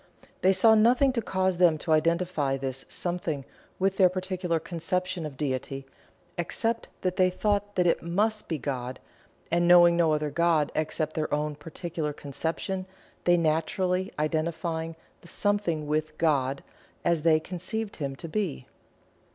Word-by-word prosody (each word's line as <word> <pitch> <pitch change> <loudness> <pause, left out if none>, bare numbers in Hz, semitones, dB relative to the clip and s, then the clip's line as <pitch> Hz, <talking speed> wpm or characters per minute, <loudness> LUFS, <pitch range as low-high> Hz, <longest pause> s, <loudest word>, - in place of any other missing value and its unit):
They 190 - +5
saw 205 +4 +6
nothing 245 +5 +4
to 235 - 0
cause 190 -3 0
them 170 -3 +5
to 160 - -4
identify 160 -3 +2
this 135 -1 -4
Something 175 -6 -2 0.3
with 195 +1 +1
their 185 -2 +6
particular 185 -2 -2
conception 175 0 -2
of 140 -3 -11
Deity, 135 -1 -3 0.5
except 230 +7 -1
that 185 0 -1
they 185 -1 +5
thought 205 +2 -1
that 180 - +2
"it 170 - +2
must 210 +6 0
be 160 - 0
God," 130 -2 -4 0.5
and 175 +1 +3
knowing 175 -1 +7
no 170 -2 +3
other 150 -1 -1
God 165 -2 +2
except 155 0 -1
their 155 -1 -2
own 150 0 0
particular 155 +1 -5
conception, 165 +7 -3 0.4
they 175 0 +5
naturally 180 +4 0
identifying 160 +1 -2 0.3
the - - -15
Something 190 -6 0
with 155 +1 -2
"God" 140 -4 +1 0.4
as 170 -2 +2
they 160 0 +4
conceived 190 +6 -5
Him 140 -3 -3
to 165 - -8
be. 170 -8 -2
170 Hz, 150 wpm, -27 LUFS, 155-185 Hz, 0.5 s, knowing